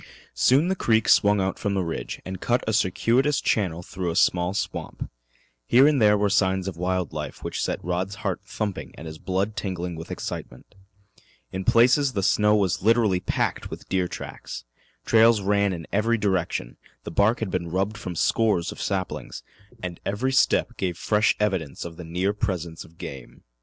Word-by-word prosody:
Soon 140 +6 +4
the 190 - +1
creek 110 - +2
swung 105 -1 +5
out 95 0 -1
from 100 -1 -1
the 95 - +1
ridge 85 -1 -5
and 95 0 -6
cut 120 +1 +1
a 110 - +1
circuitous 115 +9 +2
channel 90 -5 0
through 90 0 -4
a 85 - -3
small 90 0 +2
swamp. 105 - -4 0.6
Here 135 - +6
there 105 -6 +4
were 105 0 +2
signs 95 -1 +2
of 95 - -4
wild 90 0 -1
life - - -6
which - - -3
set - - -2
Rod's 90 +3 -2
heart 95 -1 -1
thumping 100 -1 -5
and 80 - -10
his 80 -1 -8
blood 95 +3 -1
tingling 90 -4 -3
with 80 0 -8
excitement. 60 - -7 0.8
In 95 0 -4
places 130 +6 +4
the 100 -3 -1
snow 105 +2 +4
was 95 -5 +1
literally 110 -3 +3
packed - - -2
with - - -9
deer 90 -1 +1
tracks. - - -8 0.4
Trails 115 0 +5
ran 100 0 +2
in 85 -3 -5
every 115 +3 +2
direction, 95 - -1 0.3
the - - -6
bark 100 +7 +3
had 110 -5 -3
been 85 -2 -2
rubbed 95 +5 -1
from 90 -4 -5
scores 100 -1 +1
of - - -8
saplings, 95 -2 -3 0.4
and 90 -2 -5
every 115 +7 -1
step 135 -2 +2
gave 90 -3 -2
fresh 105 +3 +2
evidence 95 -10 -1
of 85 -1 -8
the 90 - -7
near 90 +5 -1
presence 90 -6 -3
of 85 - -19
game. 65 -7 -9
95 Hz, 180 wpm, -25 LUFS, 90-110 Hz, 0.8 s, Here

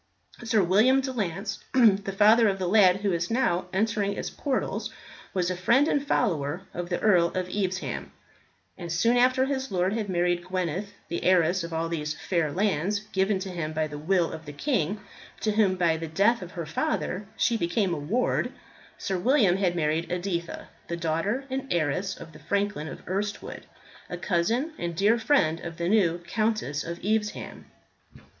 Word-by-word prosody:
Sir 225 -4 +2
William 215 +9 +4
de 265 0 -2
Lance, 195 -2 -3
the 205 -6 +4
father 220 +2 +6
of 195 - -1
the 185 - -2
lad 195 -1 +5
who 205 -1 +1
is 170 0 -1
now 230 -7 +1
entering 205 0 0
its - - -4
portals, 275 -3 -2 0.4
was 185 -1 0
a - - -2
friend 235 - +3
and 285 -3 +1
follower 170 - 0
of 175 0 -5
the 175 - -1
Earl 180 -5 +4
of 185 -1 -1
Evesham; 185 -1 -3 0.7
and 170 -2 -6
soon 230 +9 +2
after 255 +2 +4
his 265 -3 -3
lord 185 +1 +1
had 215 -3 -2
married 175 -1 +1
Gweneth 185 +1 -2 0.2
the 170 - -4
heiress 180 0 +3
of 170 - -6
all 165 0 -1
these 155 -2 -3
fair 165 -4 -1
lands 195 +2 0
given 190 +1 +1
to 190 - -4
him 160 -3 -4
by 155 0 0
the 150 -1 -7
will 175 +2 +1
of 160 -1 -9
the 145 - -7
king, 205 - -1 0.4
to 215 - +1
whom 205 -3 +3
by 170 -3 +2
the 165 0 -5
death 200 +9 +2
of 180 -1 -9
her 170 -2 -4
father 180 +5 -2
she 235 - +2
became 185 -1 0
a 155 - -3
ward 210 +13 0 0.5
Sir 190 -2 -2
William 210 -4 +3
had 180 -3 +1
married 160 +1 0
Editha, 175 -1 -3 0.2
the 170 - -3
daughter 170 - -1
and 270 +1 -3
heiress 175 +4 0
of 165 - -10
the 150 - -14
franklin 200 0 -1
of - - -10
Erstwood, 200 +3 -4 0.4
a - - -4
cousin 230 - 0
and 170 -1 -3
dear 210 +6 +3
friend 225 - +2
of 170 -1 -7
the 170 -1 -2
new 180 -4 +3
Countess 215 -9 -1
of 170 +1 -5
Evesham. 215 0 -2
185 Hz, 180 wpm, -27 LUFS, 170-215 Hz, 0.7 s, father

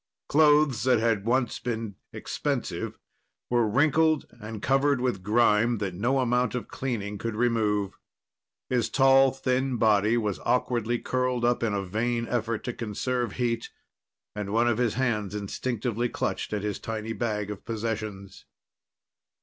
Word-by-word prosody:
Clothes 150 -4 +4
that 130 -2 +5
had 110 -3 +1
once 125 0 +1
been 115 -3 -3 0.2
expensive - - -3 0.5
were 120 -2 +3
wrinkled 155 +5 +3
and 110 0 -7
covered 135 +3 +2
with 125 -6 -1
grime 110 +2 +3
that 100 -3 -3
no 120 +9 0
amount 125 -1 +1
of 125 - -4
cleaning 105 -6 -4
could 115 +1 -3
remove. 105 -4 0 0.7
His 120 -3 0
tall, 135 +1 +5
thin 130 -1 -1
body 110 +1 +3
was 105 -4 -1
awkwardly 120 -2 0
curled 125 -1 -1
up 120 0 +2
in 110 -3 0
a 100 -1 -2
vain 115 +4 -1
effort 115 -2 -2
to 125 - -3
conserve 120 +3 -2
heat 115 -2 -1 0.7
and 105 -1 -4
one 115 +3 +3
of 120 -1 +1
his 120 -4 +1
hands 105 -6 -1
instinctively 120 +3 -2
clutched - - -3
at 105 -1 -2
his 105 -2 -2
tiny 110 0 -4
bag 105 -2 -2
of 105 - -8
possessions. 110 -3 -5
115 Hz, 145 wpm, -27 LUFS, 105-125 Hz, 0.7 s, that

